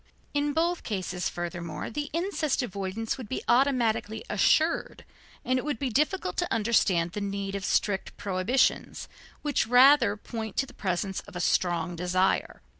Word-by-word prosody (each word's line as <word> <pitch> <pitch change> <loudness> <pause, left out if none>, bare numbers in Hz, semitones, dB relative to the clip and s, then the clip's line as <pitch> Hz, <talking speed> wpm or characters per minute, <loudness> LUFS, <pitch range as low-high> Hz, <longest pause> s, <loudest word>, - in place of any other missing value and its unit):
In 290 0 0
both 335 +2 +1
cases, 185 -4 -3
furthermore, 170 -3 -5
the 290 +5 -3
incest 325 -5 0
avoidance 200 +2 -3
would 230 -5 -8
be - - -3
automatically 235 -4 +2
assured, 310 +10 +2 0.4
and 255 +1 +2
it - - -5
would 295 -5 -2
be 265 -1 -2
difficult 300 - 0
to - - -1
understand 205 -6 +2
the 210 - -5
need 200 -1 -3
of 200 -1 -4
strict 195 +1 0
prohibitions, 200 +7 0 0.4
which 290 -6 +1
rather 250 -2 +6
point 220 -1 -6
to 275 - +2
the 255 - -15
presence 190 -2 -2
of - - -13
a - - -3
strong 175 -1 +1
desire. 180 +2 0
220 Hz, 155 wpm, -27 LUFS, 185-270 Hz, 0.4 s, rather